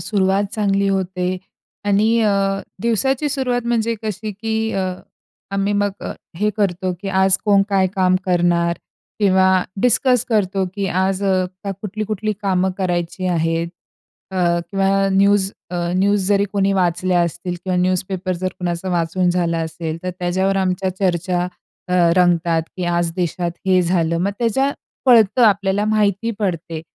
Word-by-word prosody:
सुरुवात 195 -1 +1
चांगली 200 -2 +1
होते 185 -1 -1 0.5
आणि 215 +3 +3
अ, 195 -2 +1 0.2
दिवसाची 265 +5 +1
सुरुवात 250 -3 -1
म्हणजे 230 -1 +1
कशी 215 0 -4
की 220 +2 -2
अ, 190 -1 -1 0.7
आम्ही 195 +1 0
मग 205 - +1
अ, - - -4 0.2
हे 210 +3 +1
करतो 185 -2 0
की 195 - -3
आज 190 0 +3
कोण 200 -2 +4
काय 195 -2 +3
काम 185 -1 +3
करणार 175 -1 +2 0.4
किंवा 190 -2 +4 0.2
डिस्कस 250 0 +3
करतो 195 -3 +1
की 200 -2 -2
आज 190 +2 0 0.4
कुठली 210 +2 -4
कुठली 215 0 -2
कामं 190 -1 +1
करायची 180 0 -2
आहेत 165 -1 0 0.6
अ, 190 - -6 0.3
किंवा 195 0 +2
न्यूज 195 0 +3 0.2
अ, 180 - -3 0.2
न्यूज 200 0 +2
जरी 200 -1 +3
कोणी 195 -1 +2
वाचल्या 180 -1 +1
असतील 175 +1 -3
किंवा 185 -1 0
न्यूजपेपर 185 +1 -1
जर 185 +1 -2
कुणाचा 175 +1 -3
वाचून 175 +1 +1
झाला 170 -2 0
असेल 160 0 -4
तर 185 - -2
त्याच्यावर 190 +2 0
आमच्या 190 0 0
चर्चा 180 -1 0 0.4
अ, 180 - -3 0.2
रंगतात 170 -2 +3
की 180 - -2
आज 175 -1 0
देशात 175 -1 -1 0.2
हे 185 -1 +4
झालं. 170 -1 +1
मग 195 +3 0
त्याच्यात 245 -2 +2
आपल्याला 200 -1 +2
माहिती 215 +1 +1
पडते. 170 -5 -3
190 Hz, 140 wpm, -19 LUFS, 180-205 Hz, 0.7 s, कोण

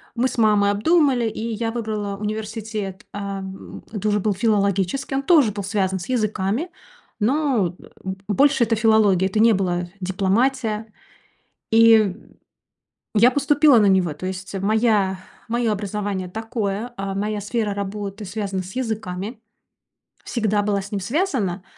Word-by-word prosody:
мы 250 +2 +2
с 250 - -5
мамой 205 -2 +4
обдумали, 260 0 +2
и 225 +1 -4
я 225 +1 -2
выбрала 215 -4 -3
университет, 215 -1 -5
э, - - -5
м, 195 -1 -7
это 215 -1 -3
уже 210 0 +2
был 205 +1 0
филологический, 200 +5 0
он 275 - 0
тоже 285 - +4
был 200 0 -5
связан 190 -1 -1
с 175 - -8
языками, 220 - -1 0.5
но, 235 - +1
э, - - -17 0.2
б 190 0 -4
больше 270 +5 +3
это 225 0 +1
филология. 215 -4 +4
Это 215 - -1
не 225 0 +6
была 180 -2 0 0.2
дипломатия, 215 +4 0 0.8
и 225 -4 +5 1.0
я 230 +4 +6
поступила 285 0 +4
на 210 - +4
него. 190 -4 +3
То 150 +5 -7
есть 190 +1 -5
моя 210 -3 +2 0.3
мое 235 0 0
образование 205 -2 -3
такое, 220 +2 -3
а 195 0 -4
моя 210 +1 -2
сфера 210 0 -2
работы 200 +1 -5
связана 195 -1 -3
с 185 - -10
языками, 220 -3 -4 0.8
всегда 215 -3 0
была 200 -1 0
с 200 - -10
ним 205 - -1
связана. 210 - -1
210 Hz, 145 wpm, -22 LUFS, 195-230 Hz, 1.0 s, не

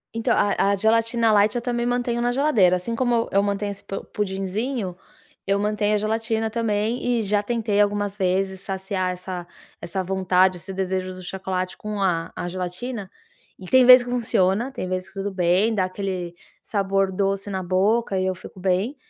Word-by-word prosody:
Então, 230 - +1
a 200 0 +2
a - - +2
gelatina 230 +2 +2
light 210 +1 +4
eu 240 - 0
também 240 -1 -1
mantenho 245 -1 0
na 240 0 +1
geladeira, 245 -10 +3
assim 180 +6 -3
como 235 -1 +1
eu 200 - +4
mantenho 200 0 -1
esse 200 0 -10
po 195 - -6
pudinzinho, 195 +1 -3 0.5
eu 200 0 +2
mantenho 210 0 +1
a - - +3
gelatina 225 +1 -1
também 225 +1 -1 0.2
e - - -1
já 205 0 +1
tentei 215 -2 0
algumas 205 -1 0
vezes 190 -1 0
saciar 190 -1 -2
essa 180 -1 -6 0.3
essa 190 +2 -3
vontade, 185 0 +2
esse 185 +3 -8
desejo 185 -1 -2
do 185 - -10
chocolate 185 0 -3
com 210 -1 -5
a 175 -4 0
a - - -4
gelatina 185 +4 -5 0.5
e 185 - -10
tem 255 +7 +5
vez 250 0 +9
que 245 - -8
funciona, 225 0 +1
tem 250 -8 -5
vez 185 0 -3
que - - -18
tudo 195 +1 -3
bem, 185 +5 +2
dá 195 -4 +1
aquele 185 -2 -4 0.3
sabor 195 -2 0
doce 195 +1 -1
na 190 -1 -3
boca 195 +3 +1
e 185 - 0
eu 185 - -1
fico 185 - -12
bem, 190 +8 0
200 Hz, 185 wpm, -23 LUFS, 185-225 Hz, 0.5 s, vez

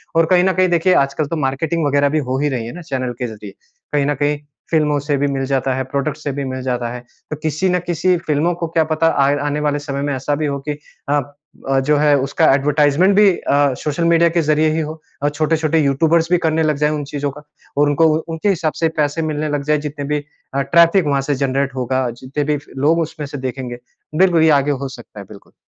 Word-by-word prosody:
और 165 0 +5
कहीं 180 -1 +5
न 190 0 +2
कहीं 185 0 +2
देखिए 175 +2 +3
आजकल 140 +1 +1
तो 165 - -3
मार्केटिंग 150 +3 -1
वगैरह 140 0 +2
भी 155 +2 +1
हो 130 +1 0
ही 145 +1 +1
रही 125 -5 -3
है 115 - -7
ना 180 - -8
चैनल 130 -6 -3
के 125 - -2
ज़रिए। 110 -2 -9 0.4
कहीं 145 -1 +2
न 145 - +1
कहीं 145 +1 0 0.3
फ़िल्मों 150 -2 +2
से 145 +1 -1
भी 145 +1 +1
मिल 135 -1 -2
जाता 135 -1 0
है, 130 - -1
प्रोडक्टस 140 +3 -3
से 145 - -2
भी 140 +1 -3
मिल 130 0 -4
जाता 125 -2 -2
है, 125 - -6 0.3
तो 155 - -3
किसी 155 +4 -1
न 180 0 +2
किसी 175 +2 +2
फ़िल्मों 160 +1 0
को 170 - -2
क्या 160 0 +2
पता 155 +1 +1 0.2
आए 140 +1 +3
आने 145 +1 -1
वाले 145 -1 0
समय 140 -1 -4
में 145 0 -1
ऐसा 135 +3 -1
भी 155 +1 -2
हो 140 -1 -2
कि - - +1 0.4
अ, 145 0 +3 0.5
अ, 135 0 +3
जो 145 +3 +2
है 145 0 +4
उसका 135 0 +1
एडवर्टाइजमेंट 150 +6 +3
भी 205 0 +6
अ, 140 -1 +2
सोशल 150 +3 -2
मीडिया 170 0 +4
के 170 +1 +1
ज़रिए 155 0 +2
ही - - 0
हो। 155 0 -5 0.2
और 145 - +3
छोटे-छोटे 155 +1 +1
यूट्यूबर्स 160 +3 +2
भी 180 - +5
करने 160 0 +2
लग 155 -2 +1
जाएँ 150 +1 +1
उन 150 -1 -3
चीज़ों 145 -1 -2
का 150 +2 -13 0.3
और 145 0 +4
उनको 155 +3 +3 0.2
उनके 165 +5 -1
हिसाब 160 -5 0
से 165 - +3
पैसे 145 +2 0
मिलने 155 -1 -2
लग 145 -1 -2
जाएँ। 150 +1 +2
जितने 145 -1 -5
भी 150 +1 -1 0.3
अ, 140 - +1
ट्रैफिक 170 +4 +4
वहाँ 140 -2 +1
से 145 - +2
जनरेट 135 0 -1
होगा, 130 0 -1
जितने 135 +3 -3
भी 150 +1 0
फिर 145 - -15
लोग 160 +4 +3
उसमें 155 -2 -4
से 145 - -7
देखेंगे। 130 -2 -5 0.4
बिल्कुल 175 -1 +4
ये 160 - +5
आगे 145 +2 -1
हो 140 -1 -3
सकता 120 -4 -12
है। 100 - -8
बिल्कुल। 100 0 -15
145 Hz, 245 wpm, -18 LUFS, 140-160 Hz, 0.5 s, भी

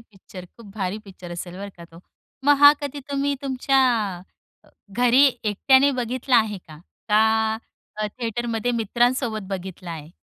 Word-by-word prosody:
Picture, 190 -4 -13
खूप 230 - -14
भारी 195 0 -2
picture 185 -3 -12
असेल 175 +1 -7
बरं 200 +1 -7
का 170 - -11
तो. 165 0 -16 0.4
मग 290 0 +5
हा 285 0 +10
कधी 285 0 -5
तुम्ही 280 0 0
तुमच्या 270 0 0 0.9
अ, - - -23 0.2
घरी 245 +5 +4 0.2
एकट्याने 265 +7 +4
बघितला 250 +2 0
आहे 215 -3 +1
का? 155 -4 -15 0.3
का 220 +1 +3 0.4
अ, 215 0 -1
थिएटरमध्ये 235 0 -2
मित्रांसोबत 235 0 0
बघितला 185 -2 -6
आहे? 160 -1 -8
220 Hz, 145 wpm, -23 LUFS, 190-250 Hz, 0.9 s, हा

